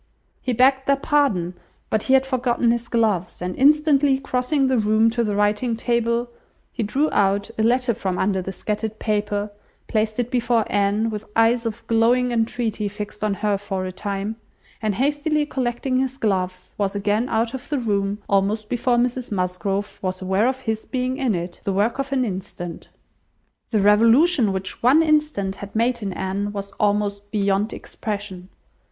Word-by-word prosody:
He 255 - -1
begged 265 +2 +3
their 280 - +5
pardon, 275 - +1 0.4
but 215 - +2
he 265 - +3
had 265 0 +3
forgotten 245 -2 +1
his 235 0 -2
gloves, 215 -7 0
and 180 +1 -4
instantly 290 -1 +4
crossing 270 +2 0
the 260 -2 +2
room 215 +1 +3
to 235 0 0
the 210 -2 -1
writing 210 +3 +1
table, 235 0 0 0.4
he 245 - -4
drew 265 +8 +1
out 200 +2 +1
a - - -1
letter 245 +2 +2
from 190 -3 -3
under 190 -1 +1
the 190 - -5
scattered 215 +3 -3
paper, 205 -1 -1 0.4
placed 215 -1 0
it 245 0 -1
before 235 -2 +2
Anne 205 +2 +1
with 210 0 -5
eyes 230 +1 +3
of 225 +1 -6
glowing 240 +2 +3
entreaty 225 -2 -1
fixed 210 +1 -7
on 210 -2 +1
her 205 -1 0
for 195 -2 -3
a 185 - -4
time, 200 +3 -4 0.4
and 215 -3 0
hastily 295 - +1
collecting 255 -1 -1
his 265 0 -1
gloves, 185 -6 -2
was 200 -1 0
again 205 +4 0
out 225 +1 0
of 260 -2 -7
the 295 - 0
room, 200 -4 0
almost 205 +2 +1
before 245 0 +1
Mrs 245 0 -1
Musgrove 195 +1 -2
was 185 -1 -2
aware 190 +4 +1
of 260 0 -1
his 220 -3 -2
being 255 0 -2
in 260 -7 +1
it: 175 0 -5
the 195 - -1
work 215 +7 +1
of 275 0 -2
an 260 -2 +1
instant! 185 -4 -6 0.8
The 215 -3 +1
revolution 230 - +5
which 190 0 -4
one 275 +7 +5
instant 300 -11 +1
had 200 +1 -9
made 235 +2 +1
in 200 -2 -3
Anne, 195 +2 -2
was 200 -1 -5
almost 205 -1 0
beyond 200 0 0
expression. 200 -4 -6
220 Hz, 175 wpm, -22 LUFS, 200-250 Hz, 0.8 s, their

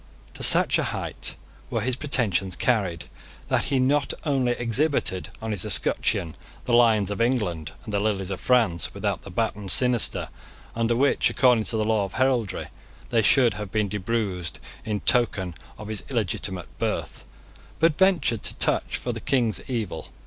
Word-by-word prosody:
To - - -11
such - - +6
a - - 0
height - - -4 0.3
were 115 - -1
his 125 +3 -1
pretensions 105 - 0
carried, 95 -10 0 0.4
that - - +1
he 135 - 0
not 140 +2 +1
only 135 -5 +1
exhibited 120 - +1
on 110 - -3
his 100 -4 0
escutcheon 80 -2 +1 0.3
the 120 - -1
lions 110 -4 +4
of 100 - -3
England 105 - -1
and 105 - -8
the 100 - +1
lilies 100 -2 -1
of 95 - -4
France 105 - +1
without - - -2
the - - -11
baton 100 -2 -2
sinister 125 +3 +2 0.5
under 115 0 +1
which, 140 +4 +2
according 125 -4 +3
to 115 - 0
the 110 - 0
law 110 -2 +1
of 95 - -6
heraldry, 130 -6 0 0.4
they 115 -2 +3
should 120 +1 +4
have 100 0 -7
been 105 -2 0
debruised 100 -4 -3 0.3
in 105 -2 -2
token 100 -7 +1 0.2
of 105 - -9
his 110 -2 -3
illegitimate 95 - -3
birth, - - -3 0.6
but 165 -1 +3
ventured 165 - +2
to - - -1
touch - - +1
for - - -4
the - - -6
king's 120 -5 0
evil. 115 -6 -4
110 Hz, 165 wpm, -24 LUFS, 100-125 Hz, 0.6 s, such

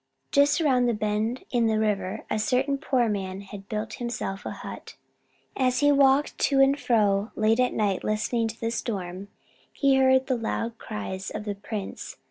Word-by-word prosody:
Just 285 +4 +4
around 260 -6 +3
the 235 - +1
bend 215 +4 -1
in 235 -2 +2
the 220 -1 +1
river 210 -3 -1
a 215 - -1
certain 270 +5 +1
poor 260 -5 +1
man 195 -2 -3
had 200 0 -11
built 215 +1 -3
himself 220 -5 -4
a - - -2
hut. - - -8 0.6
As 255 0 +1
he 290 0 +5
walked 280 0 +3
to 275 -1 +2
and 270 +1 +5
fro 210 -3 +2
late 220 +2 +2
at 250 0 +2
night 200 -3 0
listening 225 +2 0
to 225 +1 -7
the 230 0 -2
storm, 195 -5 -4 0.4
he 275 -2 +3
heard 260 0 +4
the 260 -2 0
loud 230 0 -3
cries 195 -3 -5
of - - -6
the 205 - -2
prince. 205 0 -6
225 Hz, 180 wpm, -26 LUFS, 210-260 Hz, 0.6 s, he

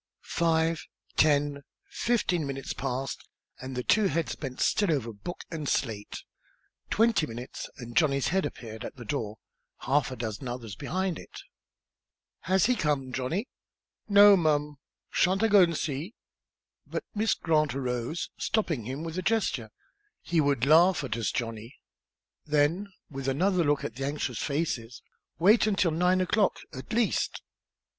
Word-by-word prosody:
Five 165 -1 +1 0.3
ten 145 -1 +3 0.3
fifteen 180 -9 0
minutes 135 -1 -4
passed 135 0 -4 0.3
and 130 0 -6
the 125 - -2
two 215 - +3
heads 165 -7 -1
bent 130 -3 -6
still 205 -5 +2
over 120 -7 -1
book 110 - -7
and 155 -4 -3
slate. 105 -5 -2 0.7
Twenty 220 -7 +3
minutes, 120 +2 -7
and 120 -2 -9
Johnny's 140 -4 +3
head 190 +2 +1
appeared 110 -1 -6
at - - -7
the 120 -3 -10
door, 110 -4 -3 0.4
half 135 +2 +1
a 130 - -5
dozen 115 +1 -5
others 120 -4 -5
behind 185 - -2
it. - - -11 1.0
"Has 190 +1 +2
he 250 - +3
come, 140 - -1
Johnny?" 160 - -2 0.6
"No'm; 160 -8 +5 0.3
sha'n't 190 +4 +2
I - - +5
go 205 -2 +7
an' 170 -2 +3
see 155 - -3 0.4
" - - -45
But - - -2
Miss 220 +1 +1
Grant 155 -5 +1
arose, 125 +3 -3
stopping 165 - 0
him 135 +6 -4
with 165 +2 -4
a - - -1
gesture. 185 - 0 0.5
"He 170 -2 +2
would 140 -4 +2
laugh 165 +3 +5
at 120 -5 -2
us, 115 -3 -1
Johnny." 115 0 -4 0.7
Then, 150 +7 +2 0.2
with 135 -1 -5
another 175 +6 +2
look 145 -2 +1
at 115 - -5
the 135 - -2
anxious 140 -5 -3
faces, 130 -6 -2 0.3
"wait 210 +7 +5
until 195 -5 +2
nine 180 +3 +2
o'clock, 200 +2 +2 0.2
at 130 +8 -8
least." 230 -1 0
150 Hz, 150 wpm, -28 LUFS, 130-180 Hz, 1.0 s, go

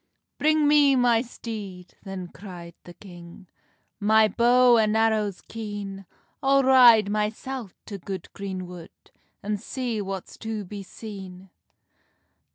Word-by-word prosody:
"Bring 310 0 +3
me 290 -2 +5
my 240 -2 +3
steed," 210 -7 -8
then 190 -3 -7
cry'd 175 -4 -10
the 175 - -12
king, 175 0 -13 0.5
"My 220 +1 +4
bow 240 +3 +4
and 215 0 +2
arrows 215 -3 +1
keen; 205 -3 -7 0.3
I'll 275 0 +3
ride 245 -5 +7
mysel 215 +3 -3 0.2
to 200 -2 -7
good 190 0 -7
green 190 -2 -5
wood, 175 -2 -10 0.5
An 210 +1 -1
see 235 +1 -4
what's 195 -2 -7
to 220 -2 -5
be 200 +2 -7
seen." 190 -2 -10
210 Hz, 125 wpm, -25 LUFS, 190-235 Hz, 0.5 s, ride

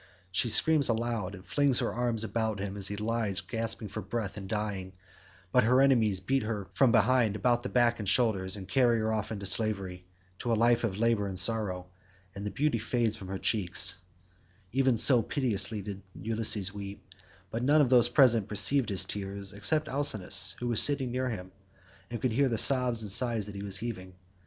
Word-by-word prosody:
She 115 +6 0
screams 150 +3 +5
aloud 115 -4 -2
and 95 0 -14
flings 140 -3 +2
her - - -1
arms 120 -2 -1
about 110 -2 -2
him 100 0 -5
as 100 -1 -1
he 105 - -4
lies 110 -2 -1
gasping 115 +2 -4
for 110 - -7
breath 105 -3 -5
and 95 -2 -8
dying, 100 -3 -4 0.6
but 125 - +3
her 125 +4 +3
enemies 115 -8 +3
beat 135 +8 -1
her 105 -3 -4
from 130 +3 +3
behind 115 -1 +2
about 120 +3 +1
the 125 - -6
back 120 -1 +1
and 105 -3 -2
shoulders, 100 -5 +1
and 95 -3 -9
carry 120 +3 +2
her 110 0 -1
off 110 0 -3
into 100 -2 -6
slavery, 95 -3 -1 0.3
to 120 - -3
a - - +3
life 115 +2 +2
of 100 -4 -2
labour 115 -2 0
and 95 -1 -6
sorrow, 95 -2 +1 0.5
and 100 +1 -6
the - - -2
beauty 145 0 -1
fades 115 0 -1
from 100 -4 -10
her 95 +1 -5
cheeks—even 95 +4 -1
so 125 +1 +5
piteously 105 -6 0
did 100 -1 -7 0.2
Ulysses 110 -3 0
weep, 100 0 -9 0.5
but 115 - -3
none 145 +5 +3
of 140 -4 +3
those 120 -2 +5
present 120 -5 +3
perceived 115 +4 +2
his 100 -2 +2
tears 100 -1 -5
except 150 +10 -1
Alcinous, 100 -9 0
who 120 - -5
was 120 -2 +6
sitting 135 -4 +2
near 130 +1 -2
him, 95 -5 -7 0.6
and 120 -1 -5
could 125 +2 -1
hear 135 +4 +1
the 115 - -2
sobs 125 -2 +2
and 105 - -5
sighs 115 -1 0
that 105 - -7
he 100 - -7
was 100 -1 -5
heaving. 95 -4 -7
110 Hz, 195 wpm, -29 LUFS, 100-120 Hz, 0.6 s, was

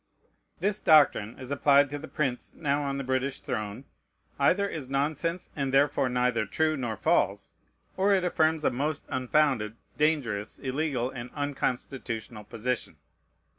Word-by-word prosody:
This 205 +1 0
doctrine, 145 -8 +4
as 130 0 -8
applied 140 0 +4
to 145 - -4
the 155 - -8
prince 130 -5 -3
now 145 -2 0
on 140 -1 -2
the 140 - -3
British 130 +1 -1
throne, 110 -1 -4 0.5
either 200 +2 +3
is 150 -9 -6
nonsense, 155 +5 -1
and 140 -2 -1
therefore 135 -1 +3
neither 125 -3 +1
true 155 +7 +1
nor 120 -6 -3
false, - - +1 0.4
or 195 +2 +3
it 190 -2 +3
affirms 160 -2 +2
a - - +3
most 145 +4 -2
unfounded, 130 -4 +1 0.2
dangerous, 135 -10 0
illegal, 135 -2 -1
and 125 -1 -7
unconstitutional 125 -6 -3
position. 120 +3 -3
140 Hz, 140 wpm, -28 LUFS, 125-150 Hz, 0.5 s, doctrine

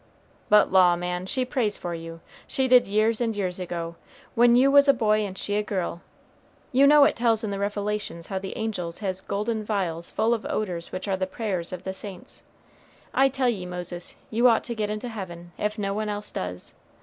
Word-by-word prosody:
"But 210 -1 +5
law, 180 -2 +6
man, 180 +1 -3
she 255 +5 0
prays 235 -5 -1
for 175 - -5
you; 165 0 -8 0.3
she 265 -1 0
did 250 -1 +6
years 215 +3 +2
and 225 -2 0
years 185 -2 -1
ago, 170 -2 -5 0.4
when 240 +1 +5
you 265 +3 +5
was 285 0 +7
a 275 - +6
boy 215 -1 +2
and 200 -3 -3
she 205 - -2
a - - +2
girl. 185 -4 -3 0.7
You 270 +2 +5
know 295 0 +8
it - - +4
tells 230 -2 +2
in 210 - -2
the 200 - -3
Revelations 205 -3 -3
how 190 - -3
the 190 0 -6
angels 180 -7 -3
has 190 -1 -2
golden 215 +3 -2
vials 180 -6 -2
full 225 +2 +1
of 225 - -2
odors 180 -5 -3
which 185 +2 -5
are 195 -1 0
the 185 0 -1
prayers 185 -4 -3
of 185 0 -6
saints. 190 -2 -10 0.7
I 270 0 +4
tell 265 -1 0
ye 190 -6 -3
Moses, 180 0 -5 0.2
you 235 +3 +4
ought 230 -2 +4
to 240 - -4
get 210 -2 -2
into 215 +3 -4
heaven, 175 -6 -7
if 210 +1 -1
no 200 -2 -1
one 215 +1 -2
else 210 0 -4
does. 90 0 -5
205 Hz, 210 wpm, -25 LUFS, 180-225 Hz, 0.7 s, know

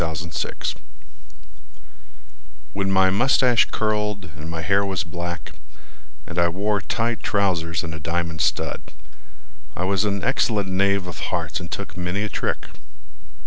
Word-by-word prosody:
Lucius 80 0 -2
Atherton - - -4 1.9
When 100 -1 0
my 95 -1 +5
moustache 125 +2 +5
curled, 105 -4 -1
And 80 +1 -7
my 80 -1 -3
hair 100 +4 +3
was 95 -3 0
black, 85 +1 -5 0.7
And 90 0 -3
I 85 - +5
wore 100 +4 0
tight 115 0 -1
trousers 85 -6 +1
And 80 0 -4
a 80 - -6
diamond 85 0 -1
stud, - - +1 0.9
I 90 - -1
was 95 +1 +2
an 100 -2 0
excellent 100 -4 +2
knave 100 0 +2
of 90 -3 -6
hearts - - -1
and - - -7
took - - -5
many 90 +3 -1
a 105 - -1
trick. - - -1
95 Hz, 145 wpm, -24 LUFS, 85-100 Hz, 1.9 s, my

